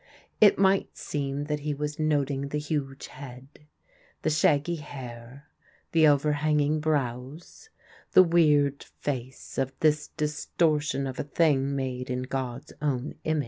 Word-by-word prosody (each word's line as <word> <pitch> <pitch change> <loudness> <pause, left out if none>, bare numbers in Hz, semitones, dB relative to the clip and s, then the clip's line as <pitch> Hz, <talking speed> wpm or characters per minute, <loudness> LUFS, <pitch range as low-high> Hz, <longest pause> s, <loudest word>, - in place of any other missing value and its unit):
It 210 -2 +7
might 195 0 +2
seem 140 -1 -3
that 150 0 -2
he 145 0 -3
was 150 +1 -4
noting 145 -3 0
the 150 - -3
huge 145 -2 -3
head, 130 -1 -10 0.8
the 155 - +1
shaggy 155 +2 +2
hair, 130 -2 -9 0.5
the 160 -2 +5
overhanging 150 +1 +2
brows, 145 - -3 0.4
the 185 - +9
weird 150 -5 +3
face 130 -2 -6
of 135 0 -1
this 155 -1 +3
distortion 150 -2 0
of 130 -1 -5
a - - 0
thing 140 -2 +1
made 130 -2 -3
in 125 0 -2
God's 130 -1 -5
own 140 -3 -1
image. 155 -1 +1
145 Hz, 135 wpm, -27 LUFS, 135-155 Hz, 0.8 s, the